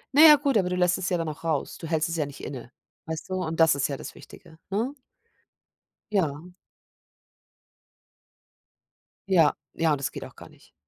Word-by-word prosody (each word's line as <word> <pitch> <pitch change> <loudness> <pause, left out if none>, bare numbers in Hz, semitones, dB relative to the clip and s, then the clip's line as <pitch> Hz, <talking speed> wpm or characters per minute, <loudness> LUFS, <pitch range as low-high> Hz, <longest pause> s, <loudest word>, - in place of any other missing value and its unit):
Na 295 - +7
ja, 310 -2 +11
gut, 280 -2 0
aber 185 -3 +1
du 180 - -1
lässt 180 0 +3
es 185 - -2
ja 180 - +1
dann 165 -1 -3
auch 150 0 -7
raus. 160 -4 -2
Du 165 - -7
hältst 160 -1 0
es 165 - -3
ja 155 - 0
nicht 140 -1 -10
inne, 125 -3 -7 0.3
weißt 160 +2 -6
du? - - -3
Und 165 -1 -4
das 160 -3 +6
ist 140 +1 0
ja 140 - -3
das - - -9
Wichtige, 160 -2 -15
ne? 230 +8 -1 1.2
Ja. 160 -6 0 2.8
Ja, 165 -6 +5 0.2
ja, 165 -1 +1
und 150 - +2
das 140 - -2
geht - - -7
auch - - -14
gar - - -13
nicht. - - -22
165 Hz, 195 wpm, -26 LUFS, 150-185 Hz, 2.8 s, ja